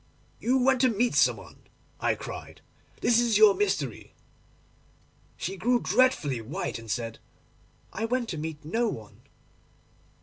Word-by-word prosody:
—"You 255 +3 +2
went 260 0 +3
to 260 - +5
meet 235 +2 +1
some - - +4
one," - - -13 0.4
I - - +1
cried; - - -9 0.4
"this 235 -1 +4
is 235 -3 +3
your 215 -1 +7
mystery." 185 - -2 1.2
She 195 +3 -4
grew 245 +4 +2
dreadfully 195 - +2
white, 115 +1 -4
and 115 -1 -12
said, 115 0 -3 0.7
"I 220 - -2
went 245 +1 -1
to 160 - -4
meet 155 -1 -6
no 230 +9 0
one." 110 - -7
210 Hz, 140 wpm, -27 LUFS, 150-240 Hz, 1.2 s, your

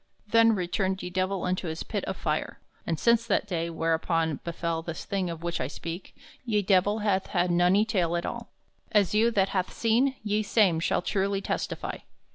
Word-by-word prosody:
Then 230 +1 +5
returned 190 +1 -1
ye 180 - -5
Divell 185 +1 -1
unto 180 0 -1
his 160 0 -4
pit - - -3
of - - -4
fire; - - -2 0.3
and 165 -2 -1
since 235 0 +3
that 205 - +1
day, 170 -3 -2
whereupon 165 -2 0
befell 170 -1 -2
this 165 -1 -6
thing 190 -3 -1
of 165 0 -6
which 170 -1 -2
I 125 - -1
speak, 165 +5 -7 0.3
ye 215 -4 +1
Divell 205 +3 +2
hath 195 -3 +1
had 175 0 +1
nony 180 +5 +4
taile 175 -6 +1
at 170 - -3
all, - - -5 0.4
as 205 -5 +3
you 220 +2 +4
that 195 -4 +2
hath 185 -2 -1
seene 245 +4 +2
ye 210 0 +1
same 200 -6 +3
shall 170 - 0
truly 195 +1 0
testify. - - -3
185 Hz, 190 wpm, -27 LUFS, 170-210 Hz, 0.4 s, Then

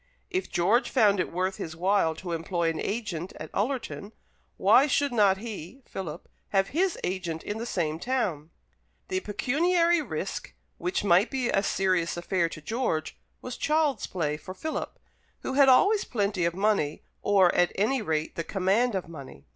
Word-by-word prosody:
If 370 +1 -2
George 205 +9 +2
found 205 -6 +4
it 180 - -1
worth 185 +2 -1
his 160 -1 -6
while 180 -2 +2
to 175 +2 -7
employ 165 0 0
an 160 - -5
agent 195 -6 -3
at - - -7
Ullerton, 225 -2 -3 0.4
why 280 - +5
should 285 0 +1
not 200 -4 +4
he 220 - -8
(Philip) 170 -4 -7 0.2
have 195 -1 +2
his 355 +4 +1
agent 175 -3 -3
in 210 +2 -4
the 235 - -4
same 160 -7 -1
town? 190 - -1 0.6
The 375 -1 0
pecuniary 335 - +2
risk, - - -5 0.2
which 365 +2 -1
might 190 +2 +4
be 255 -3 -1
a 195 - +3
serious 185 -4 0
affair 175 -1 0
to 155 - -9
George, 220 -7 -2 0.3
was 250 -1 -5
child's 305 -2 +1
play 150 -5 -2
for 185 +5 -9
Philip, 315 +11 -4 0.4
who - - -3
had 275 0 +6
always 395 +11 +5
plenty 200 -6 -1
of 170 0 0
money, 195 -7 0 0.2
or, 195 -3 +4
at 175 - +3
any 235 +6 +1
rate, 160 -5 -1
the 165 - -2
command 200 +6 +1
of 185 - -3
money. 140 - -11
195 Hz, 170 wpm, -27 LUFS, 170-250 Hz, 0.6 s, had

